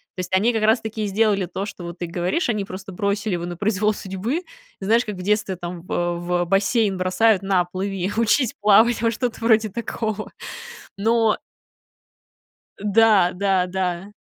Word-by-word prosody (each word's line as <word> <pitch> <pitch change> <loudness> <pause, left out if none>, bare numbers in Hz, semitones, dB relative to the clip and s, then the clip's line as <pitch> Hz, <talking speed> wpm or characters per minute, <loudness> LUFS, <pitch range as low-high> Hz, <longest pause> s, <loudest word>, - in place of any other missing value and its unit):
То - - -9
есть 180 0 -5
они 215 +6 +3
как 220 -2 -1
раз-таки 220 0 +1
и - - -2
сделали 200 -1 +2
то, 195 +2 -4
что 185 -4 -8
вот 170 0 -8
ты 175 - -2
говоришь: 175 - -1
они 210 -4 0
просто 190 0 -8
бросили 200 +2 -1
его 170 0 -4
на 175 0 -5
произвол 210 +2 +1
судьбы. 205 - -3 0.4
И - - -4
знаешь, 230 +4 +3
как 210 -3 -5
в 185 - -8
детстве 205 0 0
там, 175 0 -7
во 175 -1 -1
в 175 0 -1
бассейн 195 +1 +2
бросают: 185 +3 +2
"На, 190 -2 +2
плыви, 185 +1 -3
учись 230 +2 +2
плавать"- 215 +3 +5
во, 230 - +3
что-то 240 +1 -3
вроде 220 -1 +4
такого. 215 0 -4 0.7
Но 225 +1 +2 1.4
Э, - - -10
да, 210 -3 +4
да, 190 -1 +1
да. 185 +1 -3
200 Hz, 175 wpm, -22 LUFS, 185-220 Hz, 1.4 s, плавать